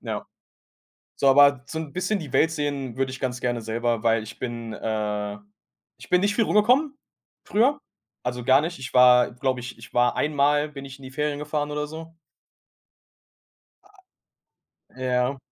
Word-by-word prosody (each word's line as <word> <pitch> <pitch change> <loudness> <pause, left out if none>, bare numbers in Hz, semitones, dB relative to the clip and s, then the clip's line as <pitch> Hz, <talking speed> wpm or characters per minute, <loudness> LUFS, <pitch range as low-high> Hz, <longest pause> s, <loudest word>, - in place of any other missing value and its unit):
Ja. - - -5 0.9
So, 140 - +3
aber 140 -1 +6
so 160 +2 -5
'n 155 -3 -6
bisschen 195 +3 -1
die 155 -7 -8
Welt 160 - +3
sehen 145 -5 -3
würde 135 -1 -1
ich 135 - -8
ganz 125 -1 -3
gerne 120 -1 -1
selber, 115 0 -1
weil 115 -1 +2
ich 110 +1 -10
bin, 115 -2 -5
äh 105 -1 -3 0.6
ich - - -13
bin 180 0 +4
nicht 205 0 +1
viel 225 +1 +2
rumgekommen 255 +9 +3 0.5
früher. 260 +8 +2 0.5
Also, 125 0 -3
gar 130 +3 +5
nicht. 170 +3 -4
Ich 130 +1 -8
war, 125 -1 +6
glaube 130 +1 -1
ich 125 0 -8
ich - - -13
war 120 0 +3
einmal 145 0 +2
bin 140 -2 -9
ich 135 0 -11
in - - -17
die 130 - -9
Ferien 150 +1 -2
gefahren 150 0 -3
oder 150 0 -2
so. 160 +2 -10 2.8
Ja. 130 +1 0
135 Hz, 165 wpm, -24 LUFS, 125-150 Hz, 2.8 s, aber